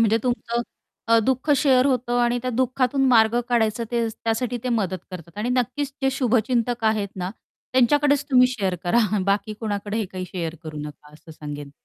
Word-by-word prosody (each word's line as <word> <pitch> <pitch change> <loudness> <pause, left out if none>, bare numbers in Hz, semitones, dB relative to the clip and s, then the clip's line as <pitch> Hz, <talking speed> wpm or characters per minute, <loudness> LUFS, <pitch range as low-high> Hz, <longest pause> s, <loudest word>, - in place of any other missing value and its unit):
म्हणजे 220 +1 +3
तुमचं 240 -1 -1 0.5
अ, 230 0 +6
दुःख 265 +3 0
शेअर 260 -1 +4
होतं 245 -2 0
आणि 240 0 +1
त्या 255 - -1
दुःखातून 255 +2 +1
मार्ग 230 -1 +4
काढायचं 230 -1 +1
ते 235 -1 0
त्यासाठी 225 +2 -2
ते - - -1
मदत 195 -6 0
करतात 170 +1 -10
आणि 225 - -1
नक्कीच 260 +3 -1
जे 270 - +3
शुभचिंतक 240 -1 +1
आहेत 215 -2 +1
ना 180 0 -3 0.4
त्यांच्याकडेच 285 +3 +3
तुम्ही 250 -1 +6
शेअर 200 -7 -1
करा. 175 +7 +3 0.3
बाकी 205 +2 0
कोणाकडे 205 -1 -3
हे 220 - 0
काही 185 0 -6
शेअर 165 -3 -4
करू 155 -1 -7
नका 150 0 -9
असं 155 +2 -16
सांगेन. 145 -2 -8
230 Hz, 175 wpm, -23 LUFS, 200-250 Hz, 0.5 s, अ